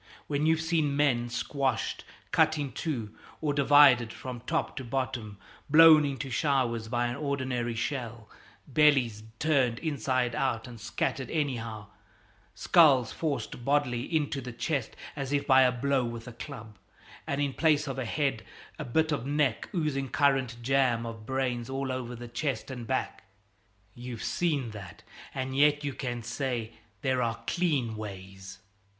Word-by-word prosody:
When 150 +1 0
you've 160 0 +3
seen 160 -4 +1
men 125 -5 +2
squashed, 135 -1 -2 0.3
cut 160 - +3
in 145 -3 -3
two, 120 -10 -4 0.3
or 150 -2 0
divided 140 -5 +6
from 125 -1 -7
top 165 0 -1
to 135 - -4
bottom, 120 -4 -3 0.3
blown 155 0 +8
into 135 -1 -4
showers 120 -5 0
by 120 +1 0
an 120 0 -2
ordinary 130 -5 -2
shell, 120 -3 -4 0.4
bellies 135 -7 +3 0.2
turned 135 -6 +2
inside 130 -5 -1
out 130 -5 -1
and 120 -3 -11
scattered 130 +3 -2
anyhow, 115 -9 -2 0.7
skulls 135 - +5
forced 135 -6 -3
bodily 140 -3 +1
into 145 -1 -1
the 125 0 -6
chest 130 +1 -2 0.2
as 140 -2 -4
if 145 -1 +1
by 130 -1 +6
a 125 -1 +5
blow 130 +1 0
with 115 0 -6
a 125 - -8
club, 115 -5 -9 0.5
and 140 - -1
in 140 -2 0
place 150 -1 +2
of 135 -1 -4
the 130 - -2
head 135 -2 -1 0.4
a - - -2
bit 155 +6 +1
of 140 -3 -2
neck, 145 -5 0
oozing 145 -6 -1
currant 135 -4 +1
jam 125 -3 +2
of 115 -1 -8
brains 130 -2 -1
all 135 0 -2
over 125 -1 -4
the 120 +1 -8
chest 120 +1 -3
and 120 -3 -7
back - - -2 0.7
you've 120 -2 -7
seen 145 -9 -1
that 100 -5 -10 0.3
and 130 0 -3
yet 145 +1 +4
you 140 -1 -2
can 120 -3 -4
say 120 -3 -3 0.3
'There 130 -1 +1
are 115 -1 -2
clean 145 -11 0
ways!'" 95 -2 -8
130 Hz, 155 wpm, -29 LUFS, 120-145 Hz, 0.7 s, blown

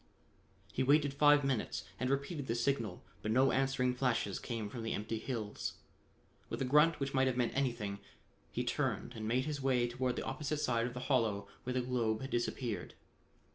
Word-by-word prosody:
He - - 0
waited 145 +1 +4
five 145 0 +6
minutes 130 -5 -1 0.2
and 125 +1 0
repeated 140 +1 -1
the 115 - 0
signal, 115 -5 -1 0.2
but 105 - -3
no 130 +4 +4
answering 135 -1 +2
flashes 125 -6 0
came 115 -4 -3
from 115 +3 -6
the 115 - -2
empty 110 +2 -3
hills. 110 -4 -3 0.8
With - - -3
a 135 - 0
grunt 150 +4 +5
which 140 0 -2
might 130 -1 +4
have 125 -1 0
meant 120 -2 +1
anything, 120 -7 -1 0.5
he - - -1
turned - - -1
and 110 -1 -5
made 125 +3 +1
his 150 -2 -3
way 125 -2 +2
toward 125 +1 -1
the - - -3
opposite 150 +3 -2
side 120 -5 +1
of 125 - -7
the 125 - -4
hollow 110 -7 +1 0.2
where 125 - -1
the 130 - +2
globe 120 -3 0
had 135 - -5
disappeared. 120 -1 -2
125 Hz, 190 wpm, -34 LUFS, 115-135 Hz, 0.8 s, five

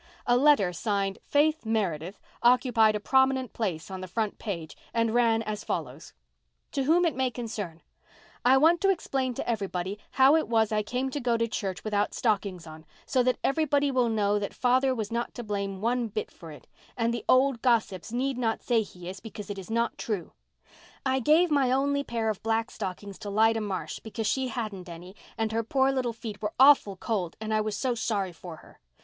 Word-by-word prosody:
A 245 - +3
letter 250 -9 +4
signed 195 +1 -1
"Faith 310 +2 +2
Meredith" 195 -5 -2 0.2
occupied 235 -3 +4
a - - -1
prominent 265 +2 +2
place 185 -6 -3
on 190 -1 -5
the 185 - -6
front 215 +3 -2
page 170 -8 -5 0.2
and 230 -1 +1
ran 230 -2 +3
as 215 -1 -4
follows:— - - -5 0.6
"TO 275 - -1
WHOM 340 +5 +4
IT 320 -7 0
MAY 260 0 +1
CONCERN: 215 -9 -6 0.6
"I 255 +2 +6
want 330 +5 +4
to 390 - +3
explain 270 -9 -1
to - - -4
everybody 200 -3 -2
how 270 +3 +6
it 320 - +1
was 225 -2 +2
I 215 -1 +2
came 255 +5 -2
to 290 - -3
go 240 -3 +1
to 230 0 0
church 195 -5 -4
without 205 -1 0
stockings 195 -6 -1
on, 155 0 -11 0.2
so 260 - +2
that 250 0 +1
everybody 285 -1 +2
will 250 -3 +2
know 210 -2 +1
that 200 - -5
father 255 +1 +2
was 220 -3 -4
not 235 +1 -3
to 240 - -5
blame 200 -2 -3
one 240 +1 0
bit 215 0 -4
for 165 -2 -12
it, 150 - -13 0.3
and 230 0 +1
the 235 - -4
old 260 -2 +4
gossips 220 -7 +1
need 255 +1 -1
not 225 -2 -1
say 235 -3 +2
he 180 -4 -10
is, 185 +1 -6
because 210 -1 -8
it 200 - -5
is 190 - -10
not 230 +1 -1
true. 205 -7 -4 0.7
I 265 0 +2
gave 310 +7 +4
my 275 -3 +3
only 280 +2 +1
pair 230 -4 -2
of 215 - -3
black 225 +1 0
stockings 195 0 -6
to 205 - -6
Lida 220 +2 +3
Marsh, 200 -3 -4
because 220 0 -5
she 260 +5 0
hadn't 210 -7 -5
any 175 +3 -10 0.2
and 225 -1 -1
her 225 +1 0
poor 265 +4 +2
little 255 -3 -1
feet 220 -2 -8
were 210 0 -2
awful 265 -7 +6
cold 185 -4 -3
and 220 0 -3
I 215 - +2
was 215 -1 -3
so 255 -2 0
sorry 205 -5 -1
for 170 0 -9
her. - - -19
225 Hz, 205 wpm, -27 LUFS, 200-255 Hz, 0.7 s, I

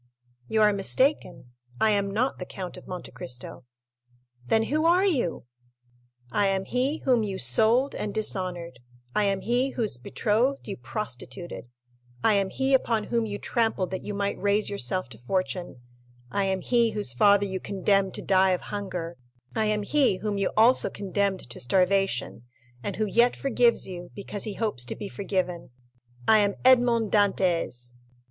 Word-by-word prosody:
"You 220 -1 +2
are 210 -1 +5
mistaken—I 190 - 0
am 200 -1 +1
not 235 +7 -1
the 180 - -5
Count 185 -2 -7
of - - -13
Monte 180 -1 -7
Cristo." 125 0 -6 0.8
"Then 225 - +3
who 305 +7 0
are 360 +3 +4
you?" 260 - 0 0.9
50261m - - -3
"I 205 - +4
am 195 0 0
he 260 +7 0
whom 250 -3 +4
you 200 -3 -3
sold 220 - +3
and 210 - -3
dishonored—I 170 - -3
am 195 -1 0
he 245 +4 +1
whose 220 - -1
betrothed 230 - 0
you 200 - -4
prostituted—I 120 - -5
am 195 -1 +1
he 270 +6 0
upon 230 -4 +2
whom 230 0 -1
you 205 -1 -4
trampled 225 -5 -1
that 190 - -3
you 205 - -5
might 200 0 -2
raise 205 +1 +1
yourself 185 -2 -1
to 110 -4 -12
fortune—I 120 -2 -4
am 190 -1 -1
he 235 -2 +2
whose 205 - 0
father 200 +9 +4
you 190 -1 -3
condemned 195 0 0
to - - -5
die 190 -1 +3
of 180 - -2
hunger—I 170 - -5
am 210 -1 0
he 265 -4 +2
whom 205 0 -3
you 195 - 0
also 235 +4 +6
condemned 200 -2 -2
to 120 - -9
starvation, 190 - +1 0.4
and 195 +7 -4
who 215 - 0
yet 235 +4 +3
forgives 245 -3 +2
you, 175 -2 -8
because 200 0 -4
he 210 -2 -4
hopes 210 - -1
to - - -5
be 205 - -6
forgiven—I 130 - -2
am 200 -1 +1
Edmond 240 -4 +4
Dantès!" 175 - +1
195 Hz, 155 wpm, -26 LUFS, 145-220 Hz, 0.9 s, also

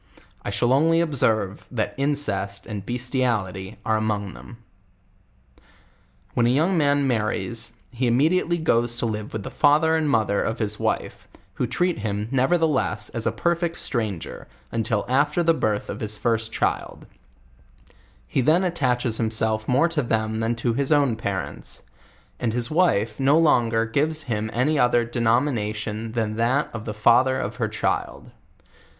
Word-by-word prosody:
I - - -4
shall 120 +5 +1
only 165 +4 +4
observe, 110 - 0
that 110 -4 -2
incest 105 -9 -1
and 105 -4 -6
bestiality 120 -6 -2
are 110 - +2
among 105 -3 -2
them. 120 - -12 1.8
When 120 -1 +2
a - - +3
young 160 +9 +2
man 145 -3 +2
marries, 115 -2 -2 0.2
he 125 0 -1
immediately 165 +8 +2
goes 120 -7 +1
to 120 - 0
livb 105 -2 -4
with 110 -2 -5
the - - -7
father 155 +2 +3
and 155 -2 +1
mathercf 110 -2 +1
his 105 -2 -1
wife, - - -2 0.3
who 125 - -2
treat 175 +7 0
him, 105 0 -3
nev 130 -1 +2
ertheless, 145 - +1
as 115 -2 -2
a - - +2
perfect 170 -1 -1
stranger, 110 - -3 0.2
until 110 -2 -1
after 145 +6 +2
the 165 0 +4
birth 105 -9 -1
of - - -6
his 110 -1 -3
first 115 0 0
child: - - -2 1.2
he 70 - 0
then 160 +8 +3
attaches 125 -9 0
himself 110 -1 0
more 130 +6 +3
to 165 -3 0
them 110 -2 -1
than 115 +1 0
to 115 0 -1
his 140 +4 -1
own 140 -6 +3
parents; 100 -4 -5 0.6
and 115 -3 -1
his 120 +2 -1
wife 145 - +1
no 135 +3 +4
longer 120 -8 +3
gives 155 +7 0
him 110 -3 -2
any 140 +5 +1
other 120 -1 +3
denomination 115 -2 -1
than 110 -2 -2
that 125 +6 +1
of 110 -1 -6
the 105 - -4
father 125 +5 +4
of 130 - -4
her - - 0
child. - - -3
120 Hz, 155 wpm, -23 LUFS, 110-145 Hz, 1.8 s, only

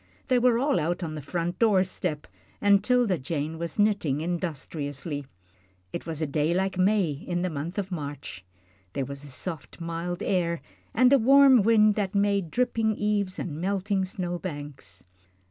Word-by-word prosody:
They 255 -1 +4
were 245 -1 +4
all 275 +3 +2
out 175 +4 -1
on 160 -2 -4
the 155 - -5
front 170 +4 -3
door 210 -5 +4
step, 180 -5 -4 0.3
and 200 -1 +4
'Tilda 240 -7 +2
Jane 155 +3 -3
was 170 0 -4
knitting 200 -10 +2
industriously. 150 -4 -4 0.7
It - - -5
was 160 -1 -3
a - - +2
day 150 +3 0
like 190 +1 0
May 190 -2 +2
in 175 +5 -3
the 185 - -1
month 155 +5 -5
of 195 -1 -3
March 145 - -6 0.5
there 135 - -1
was 140 +1 -7
a - - -10
soft, 155 +5 -5
mild 170 +1 -4
air 170 -3 0 0.4
and 255 +2 +5
a 275 - +6
warm 265 -1 +7
sun 215 -1 +5
that 205 -1 -2
made 200 -3 +2
dripping 225 0 +1
eaves 205 -3 0
and 160 -2 -4
melting 195 +1 0
snow 180 -2 -4
banks. 145 - -7
180 Hz, 170 wpm, -27 LUFS, 155-205 Hz, 0.7 s, warm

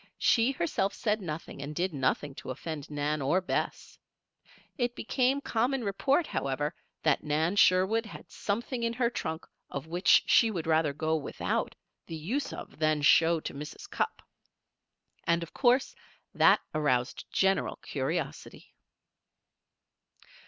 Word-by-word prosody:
She 240 +3 +3
herself 195 -1 -1
said 215 -1 0
nothing 155 -4 -6
and 145 +2 -6
did 180 +1 -1
nothing 135 +1 0
to - - -9
offend 150 +3 -5
Nan 150 0 -1
or 145 +7 +2
Bess. 185 - -3 0.8
It 245 -3 -1
became 260 +4 +1
common 250 +1 0
report, 270 - +1
however, 145 - -2 0.3
that 155 -3 +2
Nan 155 +5 0
Sherwood 200 +4 +4
had - - -11
something 235 +4 -3
in 230 0 0
her 235 0 +1
trunk 160 -7 -4 0.2
of 140 0 -5
which 175 +4 +4
she 230 - +5
would 175 -7 -3
rather 160 -2 +2
go 155 +2 -1
without 150 -3 -2 0.3
the 165 - -5
use 210 - -2 0.3
than 155 -1 +2
show 165 +2 +5
to - - -5
Mrs. 150 +2 -8
Cupp. - - -2 1.0
And, 170 0 +2
of 170 - -10
course, 255 +1 +3 0.4
that - - +5
aroused 135 -5 0
general 195 0 +1
curiosity. - - -4
170 Hz, 135 wpm, -29 LUFS, 150-225 Hz, 1.0 s, she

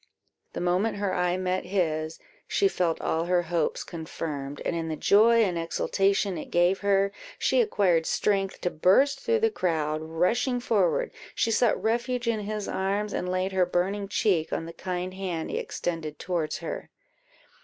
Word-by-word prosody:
The - - -4
moment 185 +5 +1
her 200 -2 -1
eye 180 0 +1
met 185 0 -1
his, 160 -4 -1 0.3
she 400 - +3
felt 175 - 0
all 165 +1 0
her 175 0 +2
hopes 170 -2 -1
confirmed; 150 -4 -5
and - - 0
in 165 -1 -2
the 160 - -2
joy 225 +6 +5
and 180 -5 0
exultation 195 +2 0
it - - -8
gave 175 +2 +3
her, 200 -1 +2 0.3
she - - +3
acquired 185 - +2
strength 195 -2 0
to 180 - 0
burst 200 - +3
through 460 -1 +1
the 450 0 +3
crowd; 155 - -1
rushing 180 +11 0
forward, 235 - +1 0.2
she 225 - +1
sought 230 0 +3
refuge 240 +2 -1
in 230 -2 +1
his 210 0 -4
arms, 200 +2 -1
and 180 - -2
laid 185 +1 0
her 190 -1 +3
burning 195 +3 -1
cheek 190 -6 +1
on 165 - -2
the 165 - -8
kind 180 +1 -4
hand 185 -4 -4
he - - -1
extended 160 -3 -4
towards 170 -4 -2
her. - - -6
185 Hz, 170 wpm, -27 LUFS, 165-205 Hz, 0.3 s, joy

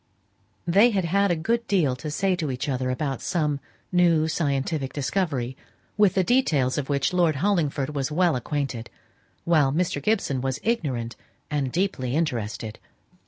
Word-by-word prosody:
They 200 +7 +5
had 195 -6 0
had 200 +4 +2
a 175 - +2
good 230 +8 -1
deal 165 -10 +2
to 155 +4 -5
say 190 +5 +1
to 155 -5 -2
each 130 +1 -3
other 130 -2 -1
about 135 0 -2
some 150 -5 0 0.3
new 170 -3 +4
scientific 140 -3 -1
discovery, 140 -4 -1 0.4
with 205 -3 +4
the 190 - +3
details 155 - +2
of 140 - -5
which 140 +4 +1
Lord 170 -4 +3
Hollingford 150 -5 0
was 140 0 -2
well 175 -1 +2
acquainted, 130 -2 -3 0.5
while 155 -5 +3
Mr. 160 -1 0
Gibson 145 - 0
was 135 +1 -2
ignorant 135 - -1 0.4
and 140 -3 -1
deeply 150 -8 -1
interested. 115 -8 -2
150 Hz, 155 wpm, -25 LUFS, 135-180 Hz, 0.5 s, They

